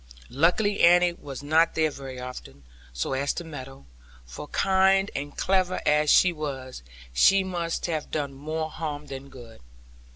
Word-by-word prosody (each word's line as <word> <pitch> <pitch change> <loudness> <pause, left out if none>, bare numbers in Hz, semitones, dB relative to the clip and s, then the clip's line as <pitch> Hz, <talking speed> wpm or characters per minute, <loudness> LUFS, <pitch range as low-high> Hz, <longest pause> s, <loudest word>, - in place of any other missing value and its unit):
Luckily 180 - +2
Annie 175 0 +5
was 140 -5 -9
not 160 +3 +3
there 155 -1 +2
very 135 -2 -8
often, 125 - -9 0.3
so - - -3
as 140 +2 0
to 175 - -5
meddle; 135 - -10 0.4
for 60 - -9
kind 195 +3 +2
and 145 +1 -5
clever 185 -1 +1
nurse - - -5
as 150 0 +3
she 180 +3 +5
was, 135 - -6 0.3
she 195 - +5
must 175 -3 -3
have 160 -3 -3
done 145 -3 -3
more 155 +3 -4
harm 150 -2 -5
than 140 -1 -8
good. 120 -4 -13
150 Hz, 160 wpm, -26 LUFS, 135-175 Hz, 0.4 s, Annie